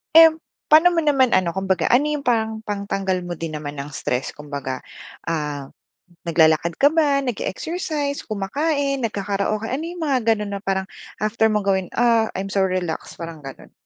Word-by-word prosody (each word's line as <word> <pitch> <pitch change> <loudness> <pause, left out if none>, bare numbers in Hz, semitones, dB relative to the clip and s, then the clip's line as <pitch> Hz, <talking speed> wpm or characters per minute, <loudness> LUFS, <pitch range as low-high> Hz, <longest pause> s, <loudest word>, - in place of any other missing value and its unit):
Um, 325 -1 +8 0.2
pano 320 +4 +7
mo 335 - +1
naman 275 -5 +3
ano 180 -2 +2
kumbaga 190 -1 0
ano 245 +4 +4
'yong 290 -3 -4
parang 220 -2 +1
pangtanggal 195 -2 -2
mo 175 - -6
din 160 -2 -4
naman 145 -1 -6
ng 140 - -5
stress 125 +2 -2
kumbaga, 140 -3 -5 0.4
ah, 150 -4 -3 0.6
naglalakad 160 0 +3
ka 285 +2 +4
ba 290 -4 +2
nag-eexercise 285 - -3
kumakain 275 +7 -1
nagkakaraoke 205 -1 -1
ano 275 +5 -2
'yong 345 -1 -5
mga 275 -4 +2 0.2
ganun 210 -1 -5
na - - -4
parang 195 -1 -2 0.4
after 220 +1 +2
mong 210 -1 0
gawin, 190 -2 +1
ah, 230 -2 +3
I'm 195 +1 -4
so 195 0 +2
relaxed 180 -3 -3
parang 165 -2 -7
ganon? 135 -2 -11
205 Hz, 165 wpm, -22 LUFS, 170-275 Hz, 0.6 s, Um